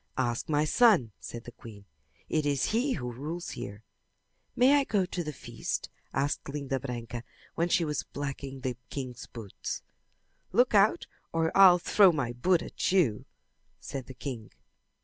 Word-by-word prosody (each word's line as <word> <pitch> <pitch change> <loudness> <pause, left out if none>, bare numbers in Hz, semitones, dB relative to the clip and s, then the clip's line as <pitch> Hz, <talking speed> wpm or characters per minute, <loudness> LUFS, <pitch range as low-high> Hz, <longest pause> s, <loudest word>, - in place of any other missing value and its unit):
"Ask 120 0 -1
my 150 0 +2
son," 185 - +4
said 120 -1 -7
the 120 - -9
queen. 105 -4 -12 0.4
"It 155 - +1
is 140 -2 +1
he 250 +5 +1
who 125 -5 -4
rules 155 +9 -5
here." 100 +2 -7 0.7
"May 270 +4 +6
I - - +2
go 205 -7 +1
to 180 -1 -4
the 150 - -4
feast?" 145 - -5 0.2
asked 140 +1 -1
Linda 140 -2 -2
Branca 120 -2 -5 0.3
when 170 +1 0
she 170 -1 +3
was 150 -1 -1
blacking 140 -1 -6
the 125 -2 -2
king's 130 -4 -6
boots. 110 -5 -6 0.7
"Look 245 0 +3
out 205 +1 +4 0.3
or 165 0 0
I'll 190 -2 +9
throw 190 +2 +5
my 135 -7 -2
boot 170 +8 +2
at - - -2
you," 155 - +2 0.5
said 135 -2 -6
the 130 - -10
king. 125 -4 -6
145 Hz, 160 wpm, -29 LUFS, 125-175 Hz, 0.7 s, I'll